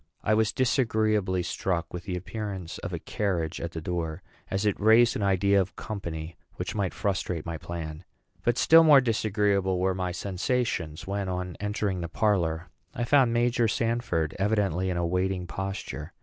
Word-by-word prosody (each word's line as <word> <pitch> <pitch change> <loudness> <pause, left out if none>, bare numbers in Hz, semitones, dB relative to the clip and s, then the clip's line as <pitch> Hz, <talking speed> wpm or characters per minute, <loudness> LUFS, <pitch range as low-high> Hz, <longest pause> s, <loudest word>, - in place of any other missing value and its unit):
I 110 - +2
was 110 0 +3
disagreeably 110 -7 +1
struck 85 -1 -2
with 90 0 -6
the 90 -2 -2
appearance 95 -2 -5
of - - -5
a - - -2
carriage 90 -6 -2
at 85 0 -4
the 80 - -4
door, 85 +1 -3 0.3
as 95 +2 -1
it 105 - +1
raised 110 +3 +5
an - - -2
idea 100 0 +3
of 95 - -5
company 85 -6 -5 0.2
which - - -4
might 100 -4 -1
frustrate 95 -5 -2
my 85 -1 -4
plan; 80 -1 -6 0.4
but 120 0 +1
still 165 +1 +7
more 150 -3 +8
disagreeable 105 -5 +1
were 95 +1 +2
my 90 -1 -2
sensations 95 -3 -2
when, 100 -1 -2
on 90 -1 -3
entering 105 -3 -1
the 85 - -4
parlor, 85 0 0 0.2
I 120 - -1
found 130 -1 +4
Major 120 0 +2
Sanford 115 -9 0
evidently 95 -3 +1
in 90 - -1
a 85 - 0
waiting 90 +1 0
posture. 95 +2 -5
95 Hz, 170 wpm, -27 LUFS, 90-110 Hz, 0.4 s, more